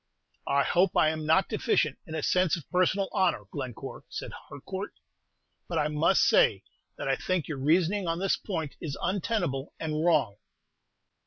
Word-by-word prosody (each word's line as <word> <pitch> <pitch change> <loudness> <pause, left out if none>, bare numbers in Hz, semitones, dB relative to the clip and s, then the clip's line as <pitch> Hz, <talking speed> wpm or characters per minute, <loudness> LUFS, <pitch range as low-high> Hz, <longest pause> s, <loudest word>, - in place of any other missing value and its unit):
"I 140 0 +3
hope 180 +1 +2
I 155 - +5
'm 155 -1 -5
not 160 +5 +4
deficient 210 - 0
in 160 - -6
a 155 - -3
sense 180 -2 +2
of 160 - -11
personal 185 +2 +2
honor, 185 - +1
Glencore," 125 -6 -6
said - - -6 0.2
Harcourt; - - -7 0.7
"but - - -3
I 150 - +1
must 150 +5 +3
say - - +4 0.3
that - - -4
I - - +2
think 185 -4 -2
your 150 -4 -4
reasoning 175 +7 +2
on 165 0 0
this 195 +1 +1
point 160 -8 -4
is 150 -5 -4
untenable 175 -7 -1
and 155 -1 -2
wrong." 145 -12 +2
165 Hz, 165 wpm, -28 LUFS, 150-185 Hz, 0.7 s, I